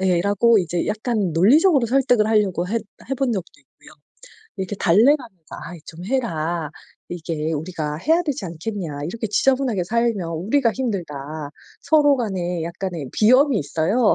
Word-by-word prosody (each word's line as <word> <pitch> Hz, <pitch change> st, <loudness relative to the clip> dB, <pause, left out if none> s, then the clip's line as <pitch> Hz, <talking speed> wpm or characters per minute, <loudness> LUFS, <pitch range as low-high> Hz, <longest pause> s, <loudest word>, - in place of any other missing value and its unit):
예. 180 Hz, -2 st, +2 dB
라고 205 Hz, +4 st, +3 dB
이제 175 Hz, -2 st, -1 dB
약간 215 Hz, -3 st, -1 dB
논리적으로 265 Hz, -, +4 dB
설득을 245 Hz, -3 st, +3 dB
하려고 195 Hz, -5 st, +1 dB
해 230 Hz, +3 st, 0 dB, 0.3 s
해본 270 Hz, -2 st, 0 dB
적도 190 Hz, -6 st, -4 dB
있고요. -, -, -21 dB, 0.7 s
이렇게 190 Hz, +1 st, -4 dB
달래 210 Hz, -, +5 dB
가면서 190 Hz, -, -14 dB
"아이 175 Hz, 0 st, -8 dB
좀 170 Hz, +2 st, -10 dB
해라. 170 Hz, -, -2 dB, 0.4 s
이게 160 Hz, -2 st, -3 dB
우리가 155 Hz, -1 st, -3 dB
해야 325 Hz, -, +2 dB
되지 285 Hz, -9 st, -3 dB
않겠냐. 170 Hz, -3 st, -5 dB
이렇게 220 Hz, +7 st, -4 dB
지저분하게 250 Hz, -4 st, +1 dB
살면 230 Hz, -4 st, 0 dB
우리가 225 Hz, -, +1 dB
힘들다." 200 Hz, -, -3 dB, 0.7 s
서로 290 Hz, -3 st, +4 dB
간에 180 Hz, -7 st, -2 dB
약간의 170 Hz, -4 st, -5 dB
비염이 255 Hz, +4 st, +4 dB
있어요. 170 Hz, -, +1 dB
200 Hz, 340 characters per minute, -21 LUFS, 170-240 Hz, 0.7 s, 달래